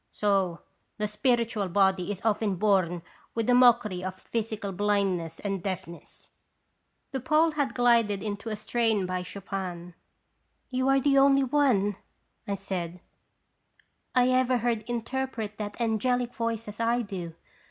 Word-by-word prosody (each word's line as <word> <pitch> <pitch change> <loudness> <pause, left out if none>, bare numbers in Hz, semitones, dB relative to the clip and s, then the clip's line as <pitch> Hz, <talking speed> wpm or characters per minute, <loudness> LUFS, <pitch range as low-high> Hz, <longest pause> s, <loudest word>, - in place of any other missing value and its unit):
So 195 -4 0 0.4
the 210 - -1
spiritual 215 -2 0
body 190 0 +2
is 200 +2 -7
often 210 -2 +1
born 185 -3 +1 0.3
with 230 -1 -1
a - - +5
mockery 240 -7 +4
of 185 0 -5
physical 215 -2 -3
blindness 195 -4 0
and 195 -2 -3
deafness." 175 -3 -6 0.8
The 265 - -2
Pole 315 +4 +3
had 285 -5 -1
glided 235 -5 +3
into 210 +1 -4
a 215 - -2
strain 220 -1 0
by 185 0 -2
Chopin. 180 -2 -6 0.8
"You 260 +1 0
are 270 0 +5
the 275 0 +4
only 275 0 +5
one/ 265 -5 +3
1 205 -2 -2 0.5
I 200 - -1
said, 180 -3 -4 1.2
"lever 255 0 +3
heard 230 -1 -1
interpret 240 -3 -3
that 205 +1 -5
angelic 240 +2 0
voice 230 -1 -3
as 210 +1 -8
I 235 +1 +1
do. 180 -6 -6
210 Hz, 140 wpm, -27 LUFS, 195-245 Hz, 1.2 s, a